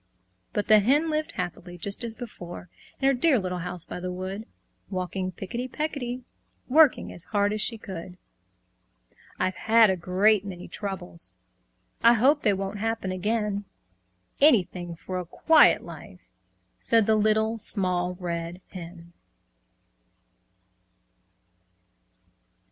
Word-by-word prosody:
But 205 - -2
the 215 -1 +7
Hen 290 +10 +2
lived 310 0 -2
happily, 175 0 -5
just 200 +6 -3
as 230 -1 -5
before, 175 -7 -9 0.3
In 270 - +2
her 275 - +5
dear 270 +2 +3
little 180 -3 -2
house 180 -1 -4
by - - -6
the 180 0 -4
wood, 190 +4 -5 0.4
Walking 185 0 -3
picketty 235 +8 -5
pecketty, 255 -5 -3 0.4
Working 300 +1 +4
as 175 - -9
hard 205 -1 +1
as 215 - -1
she 230 - 0
could. 180 -3 -8 1.2
"I've 185 0 0
had 225 -2 +5
a - - +1
great 190 +4 +2
many 185 -3 -8
troubles! 190 -4 -6 0.7
I 235 +1 +7
hope 275 +6 +4
they 210 - +3
won't 195 +1 -3
happen 225 -3 -2
again; 205 +1 -1 0.7
Anything 180 - +3
for 185 +2 -5
a - - -3
quiet 315 - +5
life!" - - -12 0.5
Said 225 -2 +3
the 220 - +3
Little 220 +1 +2
Small 180 -4 +1
Red 170 -1 -4
Hen. 170 -1 -10
200 Hz, 125 wpm, -26 LUFS, 180-230 Hz, 1.2 s, the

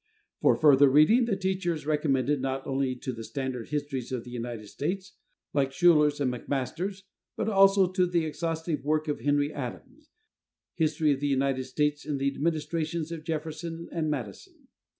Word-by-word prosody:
For - - +5
further 145 -2 +6
reading, 155 - +5
the 220 -4 0
teacher 190 -2 -1
is 155 - -9
recommended 145 -2 +1
not 135 0 -2
only 135 -1 -1
to 125 +1 -5
the 115 -1 -7
standard 130 -2 -4
histories 145 -4 -3
of 125 -3 -3
the 125 - -11
United 120 -2 -5
States 185 - -4 0.4
like 135 -2 +1
Schouler's, 150 -2 +4
and 130 -3 0
McMaster's, 150 - -3 0.3
but - - -1
also 195 -2 +5
to 185 -1 +2
the 170 -2 +1
exhaustive 160 -1 -3
work 155 +2 0
of 150 - -2
Henry 145 +1 +1
Adams, 255 - -8 0.6
"History 155 -2 +1
of 135 - 0
the 145 - -1
United 135 -1 0
States 150 +3 -1
in 145 -2 -2
the 140 0 0
Administrations 160 +1 -2
of 165 -2 -6
Jefferson 165 +1 -5
and 160 -2 -1
Madison." 120 -10 -6
150 Hz, 170 wpm, -28 LUFS, 135-165 Hz, 0.6 s, further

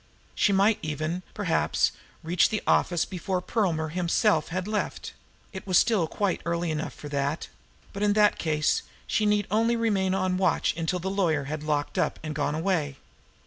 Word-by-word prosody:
She 205 - +2
might 200 +2 +3
even, 155 +3 -3
perhaps, 180 -6 +1 0.3
reach 170 +2 +3
the 215 - -2
office 175 -2 +2
before 185 0 -3
Perlmer 175 -6 -1
himself 175 +1 +1
had 185 +3 -3
left 215 -1 -3 0.4
it 190 0 -8
was 185 -2 +4
still 215 -8 +3
quite 200 +2 -1
early 170 0 -1
enough 155 0 -3
for 150 - -9
that 140 +2 -2 0.4
but 200 - -6
in 205 -1 +3
that 210 0 +3
case 155 -2 +1 0.2
she 215 - +1
need 210 -1 +2
only 230 +2 +2
remain 200 -5 +1
on 185 -1 0
watch 185 -2 +2
until 165 +2 -1
the 190 +2 -3
lawyer 170 -7 +1
had 150 +2 -5
locked 150 -1 -1
up - - 0
and 155 -1 -4
gone 145 0 -1
away. 160 -5 -1
180 Hz, 175 wpm, -27 LUFS, 155-200 Hz, 0.4 s, was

